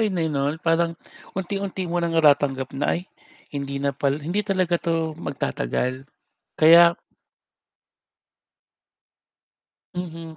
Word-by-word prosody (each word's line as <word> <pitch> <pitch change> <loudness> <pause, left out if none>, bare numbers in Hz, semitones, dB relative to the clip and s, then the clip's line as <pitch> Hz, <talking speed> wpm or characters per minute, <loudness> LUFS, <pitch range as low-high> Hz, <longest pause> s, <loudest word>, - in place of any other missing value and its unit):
'yon 210 -4 0 0.2
'no, 140 -1 0
na 150 - -3
parang 165 0 +1 0.4
unti-unti 190 0 -3
mo 175 0 -1
ng 170 -1 -1
natatanggap 140 -4 +3
na 135 +1 0
ay - - -4 0.5
hindi 140 -1 -4
na 140 0 -1
pala, 140 +1 0
hindi 175 +6 0
talaga 185 -4 0
'to 165 -1 -1
magtatagal 130 - -3 0.5
kaya 170 +2 +7 3.0
Mhm, 165 -2 -6
165 Hz, 110 wpm, -23 LUFS, 140-175 Hz, 3.0 s, kaya